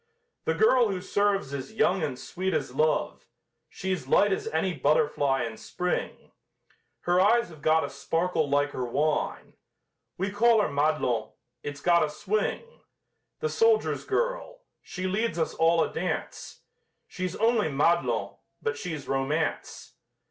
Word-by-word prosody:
The - - +1
girl 255 - +4
who 190 -2 -2
serves 200 -6 0
is 135 +6 -6
young 210 -4 +2
and 145 -5 -2
sweet 185 +5 -3
as 125 - -2
love, 155 +3 0 0.4
She's 190 -8 -4
light 200 +8 +4
as - - -3
any 165 +4 0
butterfly 145 -2 +1
in 115 -1 -5
Spring, 180 0 -4 0.7
Her 175 +1 +2
eyes 230 +2 +3
have 155 -3 -14
got 160 +2 +3
a - - -3
sparkle 165 -3 -1
like 145 +1 +2
her 130 - -3
wine. 145 +5 -1 0.6
We 195 +2 -2
call 225 +2 +4
her 210 - +1
Madelon 140 -6 0 0.3
it's 145 +1 -6
got 170 0 +4
a 155 - 0
swing! 205 - -2 0.8
The 460 - 0
soldiers' 450 -1 +2
girl! - - -2 0.2
She 185 - -6
leads 200 +2 -1
us 160 - -1
all 165 0 +3
a - - -4
dance! 180 +2 -4 0.5
She's 185 -1 -4
only 225 -6 +2
Madelon, 160 +5 +1 0.2
but 455 0 -2
she's 160 -8 -5
Romance! 140 +4 -2
170 Hz, 145 wpm, -27 LUFS, 145-205 Hz, 0.8 s, girl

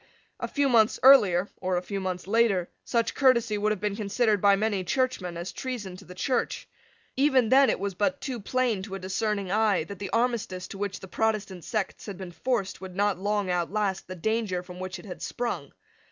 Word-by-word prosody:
A - - -2
few 285 -1 +1
months 230 -4 +4
earlier, 200 -9 +7
or 185 -1 -1
a 175 - -2
few 200 +2 -4
months 185 -1 -3
later, 200 -4 +2
such 230 -1 0
courtesy 245 -5 +3
would 210 +1 +1
have 210 - -1
been 205 0 -1
considered 210 0 +1
by 200 -1 +6
many 205 -2 0
Churchmen 195 -6 -1
as 175 +2 -5
treason 230 -8 -5
to 195 - -13
the 180 - -11
Church. 250 +7 -1 0.5
Even 265 -4 +3
then 270 +1 +6
it - - 0
was 200 0 -2
but 245 +10 0
too 255 -4 -4
plain 235 -1 0
to 195 0 -6
a - - -5
discerning 195 +1 -2
eye 215 -4 +3
that 200 +4 -9
the 195 - -4
armistice 230 -6 -1
to 195 - -8
which 200 -2 -3
the 190 - -9
Protestant 205 -3 -1
sects 215 -3 -3
had 200 -3 -6
been 185 -2 -7
forced 215 -1 -2
would 185 -1 -8
not 200 -2 +1
long 205 -1 0
outlast 190 +3 -1
the 185 - -6
danger 205 -1 -1
from 180 0 -10
which 185 0 -5
it - - -12
had 185 - -8
sprung. 240 -1 -3
205 Hz, 210 wpm, -27 LUFS, 185-230 Hz, 0.5 s, earlier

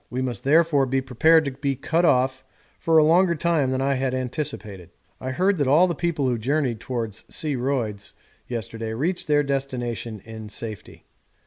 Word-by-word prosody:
We 130 +1 -2
must 120 -5 -4
therefore 150 -1 +3
be 135 +1 +1
prepared 155 +5 +3
to 140 - -2
be 140 +1 -2
cut 165 +6 +1
off 130 -2 +2 0.4
for 165 -1 +3
a 155 - +7
longer 170 +3 +4
time 155 -4 +1
than 130 0 -1
I 135 -1 0
anticipated. 130 - -4 0.3
I 130 - -4
heard 185 +8 +1
that 145 -3 +1
all 150 +7 +6
the 175 - -1
people 160 -4 -1
who 120 -2 0
journeyed 130 -1 0
towards 115 -3 -4
C. 150 -3 -3
Royds 120 -6 -2 0.3
yesterday 115 -1 -5
reached 170 +9 -2
their 145 -1 +3
destination 125 -5 -3
in 110 -1 -9
safety. 110 -1 -8
135 Hz, 175 wpm, -24 LUFS, 120-155 Hz, 0.4 s, a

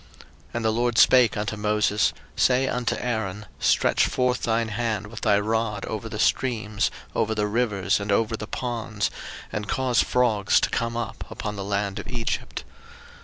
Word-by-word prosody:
02:008:005 - - -20 0.3
And 120 -1 -2
the 110 - +3
LORD 120 +1 0
spake 125 -3 +6
unto 105 +1 -2
Moses, 105 0 +2 0.2
Say 130 +1 +3
unto 125 -2 -1
Aaron, 110 -4 -3
Stretch - - +3
forth 125 0 0
thine 115 -1 0
hand 110 -1 -2
with 110 +1 -9
thy 100 -2 +3
rod 110 0 -1
over - - -5
the - - -5
streams, 110 -5 +1 0.2
over 110 0 0
the 105 -1 +1
rivers, 105 -3 +1
and 100 0 -3
over 115 +2 +2
the 105 - -6
ponds, 115 -5 -2 0.4
and 105 -1 -4
cause 130 -2 +2
frogs 110 -5 +2
to - - 0
come 115 0 -1
up 120 - -4
upon 105 0 -5
the 100 - -4
land 100 0 -2
of - - -8
Egypt. 120 -3 -3
110 Hz, 170 wpm, -25 LUFS, 105-120 Hz, 0.4 s, spake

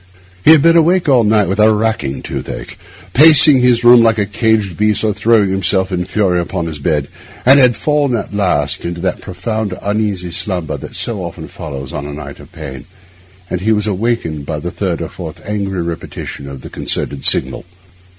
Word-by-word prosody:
He - - +4
had 155 -3 +7
been 165 0 +5
awake 170 +2 +3
all 130 -4 +4
night 105 -2 +2
with 95 +4 -2
a 110 +1 +5
racking 105 -11 -1
toothache—pacing 140 - +2
his 120 -1 +3
room 120 0 +7
like 115 -1 +3
a 105 - +1
caged 105 -3 0
beast 105 +2 +1
or 110 -1 +1
throwing 110 -3 +2
himself 95 0 0
in 90 -1 -2
fury 95 -3 0
on 85 - -2
his 80 -3 -6
bed—and 80 - +1
had 125 -3 +4
fallen 145 -4 0
at 110 - -5
last 80 -9 0
into 85 0 -5
that 95 - -2
profound, 105 +1 -4
uneasy 100 -4 -2
slumber 90 -2 -3
that - - -8
so - - -2
often - - -7
follows 70 -4 -8
on 70 - -5
a 75 - -7
night 70 -1 -9
of - - -15
pain, 70 -5 -9 0.6
when 90 - -2
he 105 +4 0
was 105 -1 +1
awakened 105 -7 -2
by 75 +2 -4
the 85 +4 -5
third 90 -4 -3
or - - -4
fourth 85 -1 -9
angry 100 -4 -2
repetition 80 -4 -7
of 70 -1 -9
the - - -10
concerted 70 -1 -2
signal. - - +2
100 Hz, 190 wpm, -15 LUFS, 85-115 Hz, 0.6 s, had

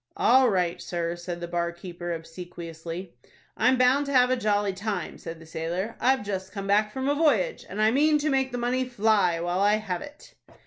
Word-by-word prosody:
"All 255 +1 +5
right, 180 -4 0
sir," 170 -1 -3
said 175 0 -6
the 170 - -4
bar 170 0 -1
keeper, 175 0 -7
obsequiously. 170 +1 -7 0.4
"I'm 255 +1 +3
bound 260 +3 +3
to - - -3
have 250 -2 +4
a - - +4
jolly 205 -4 0
time," 200 +2 -4
said 165 0 -8
the 165 - -13
sailor. 170 +7 -4
"I've 260 -3 +2
just 190 -1 -4
come 195 -1 -5
back 210 +2 +2
from 265 +2 -3
a 285 - +3
voyage, 290 - +1
and 200 - -6
I 215 +1 +4
mean 300 +4 +4
to 300 0 0
make 265 -1 +1
the 245 - -3
money 245 +2 0
fly 215 -8 +2
while 175 +2 -1
I 205 +1 +4
have 195 -5 -3
it." 290 0 -12
200 Hz, 210 wpm, -26 LUFS, 175-250 Hz, 0.4 s, All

